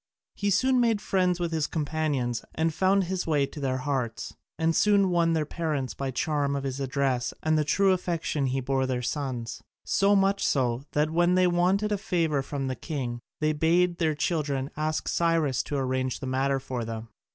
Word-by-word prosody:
He 205 - -1
soon 255 +6 +3
made 230 -3 +2
friends 180 -3 +1
with 170 -1 -1
his 160 -2 0
companions 150 -6 -1
and 160 0 +1
found 190 +3 +3
his 185 0 -3
way 145 -3 +2
to 150 - -9
their 130 -2 -1
hearts, 130 -4 -3 0.2
and 165 0 +1
soon 200 -3 +4
won 170 -1 +3
their 155 -2 +1
parents 150 -5 -2
by 135 - -4
the 130 - -4
charm 145 +1 0
of 140 - -3
his 135 0 -3
address 130 -2 -1
and 155 0 +2
the 155 - +3
true 195 +6 +3
affection 170 -6 -1
he 130 +1 -1
bore 135 0 0
their 125 -1 -2
sons, 125 -4 -3 0.2
so 200 +1 +3
much 195 0 +2
so 125 -3 +1
that 150 +1 +1
when 175 +2 +3
they 185 0 +4
wanted 180 +4 +2
a 205 - 0
favour 165 -8 0
from 135 0 -4
the 130 -1 -2
king 125 -7 -4 0.2
they 155 0 +2
bade 170 +3 +2
their 155 -2 +1
children 145 -3 -1
ask 155 +1 -2
Cyrus 165 -6 +1
to 145 - -5
arrange 130 -1 -1
the - - -6
matter 135 +1 0
for 130 -2 -4
them. 115 0 -6
150 Hz, 195 wpm, -27 LUFS, 135-175 Hz, 0.2 s, soon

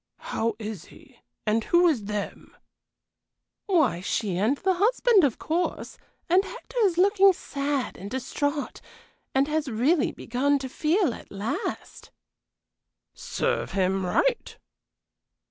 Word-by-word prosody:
"How 230 +1 0
is 215 -6 -6
he? 275 -6 -18 0.3
and 220 +1 +1
who 350 +1 +4
is 255 -11 +1
'them'?" 210 0 -5 1.1
"Why, 310 - +2
she 200 0 -1
and 215 +10 +1
the 380 +4 +1
husband, 430 +1 +3
of 270 -6 +2
course, 340 +3 -3 0.3
and 365 +3 +4
Hector - - -7
is 355 -4 +1
looking 390 +1 +5
sad 280 -4 -3
and 195 +2 -7
distrait 285 +4 -3 0.5
and 270 +1 +3
has 305 -1 -1
really 260 +8 +2
begun 275 +4 0
to 265 -1 -6
feel 320 - +1
at - - -12
last." 215 - -5 1.0
"Serve - - -2
him 190 0 +1
right!" 475 - 0
280 Hz, 125 wpm, -26 LUFS, 220-355 Hz, 1.1 s, looking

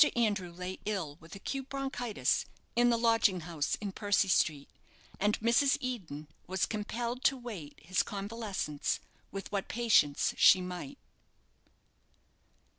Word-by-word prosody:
Andrew 205 -6 +1
lay 180 +2 -6
ill 185 -9 -2
with 165 +2 -12
acute 270 +7 -5
bronchitis, 245 - -1 0.3
in 240 +1 +5
the 235 - +3
lodging 225 -5 +3
house 160 -3 -1
in 205 -2 -5
Percy 205 0 +2
Street, 150 -5 +2 0.5
and 210 +2 +2
Mrs. 235 +5 +4
Eden 180 - -5 0.2
was 185 -2 +1
compelled 235 +4 -3
to 270 - +4
wait 205 - -8
his 180 +4 +1
convalescence 200 -7 -3 0.3
with 195 +1 -6
what 200 -2 -2
patience 215 -12 +3
she 185 - +8
might. 180 +10 -6
205 Hz, 125 wpm, -32 LUFS, 180-235 Hz, 0.5 s, she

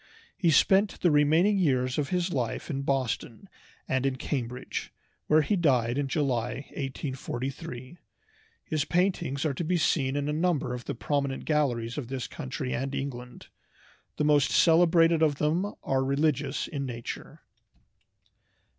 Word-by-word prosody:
He 175 - +2
spent 190 +7 +4
the 175 - +4
remaining 160 +8 +4
years 130 -5 +1
of 145 -1 -1
his 180 0 0
life 125 +4 -2
in 135 -1 -2
Boston 135 - -2 0.4
and 130 0 0
in 135 -1 0
Cambridge, 125 -2 -4 0.4
where 155 0 +5
he 205 - +1
died 130 - +2
in 140 - 0
July, 135 -2 -1
1843. 130 0 -5 0.7
His 155 -3 0
paintings 175 -5 0
are 150 - +1
to 155 - -3
be 175 +2 +1
seen 140 -4 +1
in 145 0 -1
a 150 - -1
number 160 -5 0
of 125 -1 -6
the - - -4
prominent 140 +1 -2
galleries 125 -6 0
of 130 - -6
this 130 -1 -4
country 130 -3 -5
and 135 +2 -2
England. 125 -3 -6 0.7
The - - 0
most 145 -2 +4
celebrated 165 -1 +4
of 155 -3 +3
them 165 +8 0
are 135 0 +1
religious 140 0 0
in 140 -3 -4
nature. 120 -1 -7
140 Hz, 145 wpm, -28 LUFS, 130-160 Hz, 0.7 s, where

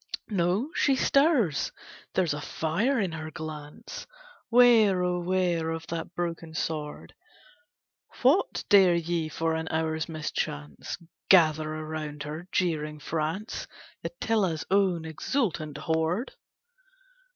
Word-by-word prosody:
No, 195 - +1
she 275 - +3
stirs! 270 - +3 0.4
There's 180 -5 +2
a 150 - -4
fire 200 - 0
in 190 -5 0
her 160 0 -5
glance, 155 -2 -8 0.4
Ware, 225 -6 +6
oh 180 0 0
ware 175 -2 0
of 165 0 -4
that 165 +1 -5
broken 165 -2 -4
sword! 150 -2 -4 1.1
What, 290 +10 +3
dare 190 -4 +6
ye 170 -1 -1
for 165 +1 -1
an 160 0 -2
hour's 160 0 -1
mischance, 75 - -4 0.3
Gather 155 -4 +5
around 155 -1 -5
her, 155 +4 -6
jeering 155 -4 0
France, 160 +7 -3 0.4
Attila's 205 - 0
own 190 -4 +2
exultant 160 - -2
horde? 160 - -1
165 Hz, 110 wpm, -28 LUFS, 155-190 Hz, 1.1 s, Ware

